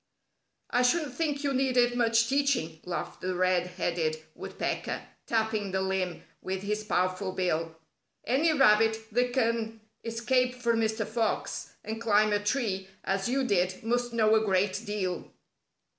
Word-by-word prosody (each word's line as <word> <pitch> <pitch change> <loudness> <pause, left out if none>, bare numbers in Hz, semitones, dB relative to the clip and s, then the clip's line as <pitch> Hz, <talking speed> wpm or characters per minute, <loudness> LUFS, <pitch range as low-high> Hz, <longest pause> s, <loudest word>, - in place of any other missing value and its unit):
"I 245 - +3
shouldn't 280 +2 +2
think 290 -1 -1
you 280 -1 +1
needed 250 -2 +2
much 230 -1 +3
teaching," 270 - +1
laughed 180 -1 -4
the 185 0 -2
Red 180 0 +2
Headed 170 -3 -1 0.2
Woodpecker, - - -4 0.2
tapping 220 -3 0
the 190 0 -1
limb 190 -2 -2 0.2
with 190 +1 -4
his 210 +1 -2
powerful 185 -1 0
bill. 165 -3 -1 0.5
"Any 280 +7 +3
rabbit 220 -6 +5
that 245 +2 +1
can 230 -3 0 0.2
escape 250 +2 +1
from 235 -2 +1
Mr. 220 0 0
Fox 225 +1 -2
and 220 +1 -5
climb 215 -2 +3
a 205 - +2
tree 205 -4 -1 0.2
as 195 +3 -1
you 270 +2 +1
did 185 -5 0
must 240 +1 0
know 220 -2 +3
a 220 0 +4
great 195 +1 +1
deal." 190 -4 -3
220 Hz, 145 wpm, -29 LUFS, 190-245 Hz, 0.5 s, rabbit